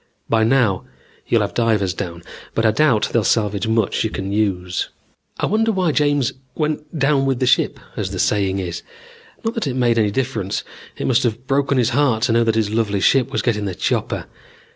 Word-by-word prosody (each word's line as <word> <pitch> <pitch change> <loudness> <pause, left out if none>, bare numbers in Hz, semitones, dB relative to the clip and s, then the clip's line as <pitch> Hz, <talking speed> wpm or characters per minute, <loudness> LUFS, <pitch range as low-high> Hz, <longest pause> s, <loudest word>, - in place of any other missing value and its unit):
By 110 -1 +2
now 110 -5 +2 0.4
you'll - - +3
have - - -2
divers 105 -6 +1
down, 85 -3 -6 0.3
but 115 - +1
I 110 - +5
doubt 125 -3 +2
they'll 115 - +3
salvage 105 -1 +1
much 110 -2 +1
you 110 - 0
can 95 -1 -4
use. 95 -4 -1 0.5
"I - - +1
wonder 225 +2 +2
why 185 -5 +1
James 145 -3 +1 0.2
went 155 +1 -3
down 135 -1 +2
with 135 -2 +1
the 130 - +1
ship, 125 - +2 0.2
as - - -2
the - - -5
saying 100 -2 +1
is? 90 -3 -4 0.6
Not 225 - 0
that 230 -10 -2
it 130 - -2
made 120 -2 +2
any 105 -2 +3
difference. 110 -4 -2 0.3
It - - -3
must 125 -2 +3
have 120 +1 -2
broken 140 0 +1
his 120 -1 +3
heart 125 -4 +2
to 120 - +2
know 115 +1 +4
that 115 -1 +1
his 110 -2 0
lovely 110 -3 0
ship 130 +6 +3
was 110 - -1
getting 105 -4 0
the 95 -3 -3
chopper. - - -1
115 Hz, 205 wpm, -20 LUFS, 105-135 Hz, 0.6 s, I